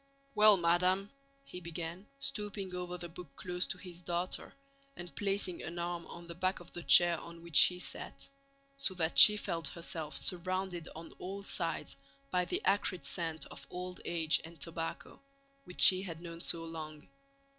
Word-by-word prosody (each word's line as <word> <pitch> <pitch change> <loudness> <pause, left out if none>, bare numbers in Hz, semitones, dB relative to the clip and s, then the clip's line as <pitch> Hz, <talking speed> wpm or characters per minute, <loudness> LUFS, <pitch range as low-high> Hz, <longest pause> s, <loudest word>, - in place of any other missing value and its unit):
"Well, 210 -3 +6
madam," 180 +3 +2 0.3
he 180 - -9
began, 170 +2 -7
stooping 195 +7 -4
over 180 0 -5
the 175 0 -5
book 170 +1 -12
close 180 0 -2
to - - -2
his 180 -2 -11
daughter 175 +1 -3 0.4
and 175 -1 -9
placing 195 -3 -1
an 170 - -7
arm 175 0 -4
on 170 - -10
the 170 - -7
back 185 +2 -1
of 175 - -14
the 175 - -6
chair 170 -1 +6
on 170 0 -12
which 170 -3 -10
she 180 - +8
sat, 180 - -6 0.5
so 205 -9 0
that 165 -2 +1
she 210 -2 +11
felt 165 -6 -1
herself 160 0 -5
surrounded 185 -1 -2
on 165 +1 -9
all 195 +2 -6
sides 170 -4 -2 0.3
by 180 0 +1
the 365 - -3
acrid 195 -3 +1
scent 165 -3 -1
of - - -10
old 180 0 -7
age 165 -2 +1
and 165 +1 -12
tobacco, 165 -1 -5 0.4
which 180 - -8
she 185 0 +8
had 170 -4 -7
known 170 -1 -8
so 165 -1 +3
long. 155 -2 -8
175 Hz, 170 wpm, -33 LUFS, 170-185 Hz, 0.5 s, she